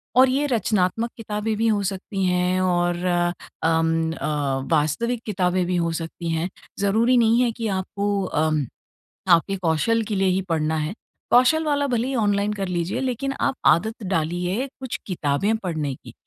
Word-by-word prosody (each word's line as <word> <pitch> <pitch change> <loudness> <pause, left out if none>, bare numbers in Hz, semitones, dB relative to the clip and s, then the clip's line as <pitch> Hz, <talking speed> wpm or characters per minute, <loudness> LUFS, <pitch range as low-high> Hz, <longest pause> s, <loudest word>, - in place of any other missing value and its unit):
और 260 +1 +7
ये 275 +3 +1
रचनात्मक 225 -2 +1
किताबें 215 -1 -2
भी 225 +1 +1
हो 210 -2 +2
सकती 195 0 -2
हैं 180 0 +1
और 175 -1 +1 0.7
अम 165 0 +2
अ, 150 - -4 0.4
वास्तविक 165 +11 +1
किताबें 185 -3 0
भी 180 +1 -1
हो 170 -1 +1
सकती 165 +1 -5
हैं, 165 +2 -1 0.3
ज़रूरी 225 +5 +3
नहीं 230 0 +4
है 245 -2 +2
कि 225 0 -4
आपको 200 +1 -1
अ, 155 -3 0 0.8
आपके 170 +4 +3
कौशल 185 +6 +1
के 215 -1 -3
लिए 195 0 +2
ही 185 +1 +2
पढ़ना 160 -1 0
है। 155 +3 -2 0.4
कौशल 255 +6 +5
वाला 285 -2 +1
भले 245 -1 0
ही 270 - -2
ऑनलाइन 205 -2 +1
कर 195 -2 -3
लीजिए 175 0 -2
लेकिन 265 +1 -2
आप - - +1
आदत 220 +8 +2
डालिए 175 - -1
कुछ 260 -2 -4
किताबें 180 +3 0
पढ़ने 155 -9 -3
की, - - -14
195 Hz, 165 wpm, -23 LUFS, 170-230 Hz, 0.8 s, और